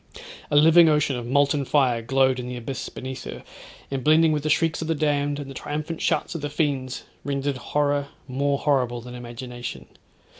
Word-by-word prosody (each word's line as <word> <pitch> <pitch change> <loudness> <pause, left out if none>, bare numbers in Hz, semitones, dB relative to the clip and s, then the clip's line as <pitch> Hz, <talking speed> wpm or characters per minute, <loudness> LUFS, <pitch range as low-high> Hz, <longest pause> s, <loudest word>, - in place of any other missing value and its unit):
A - - 0
living 160 +2 +7
ocean 150 -2 +2
of 120 -1 -5
molten 140 +2 +2
fire 130 -4 +2
glowed 130 +2 +2
in 125 - -5
the 125 0 -5
abyss 120 +3 -5
beneath 130 0 -7
her, - - -7 0.5
and 135 -2 -2
blending 155 +1 +5
with 150 -1 0
the 155 - -2
shrieks 165 +2 +2
of 160 - -3
the 165 - +1
damned, 145 -1 0
and 145 -1 -6
the 135 - -8
triumphant 155 +4 -4
shouts - - 0
of 165 - -5
the 145 - -3
fiends, 140 -4 -1 0.2
rendered 140 -1 -2
horror 145 +1 0 0.2
more 140 +2 0
horrible 125 -5 +1
than 125 +1 -10
imagination. 120 0 -7
140 Hz, 190 wpm, -24 LUFS, 130-150 Hz, 0.5 s, living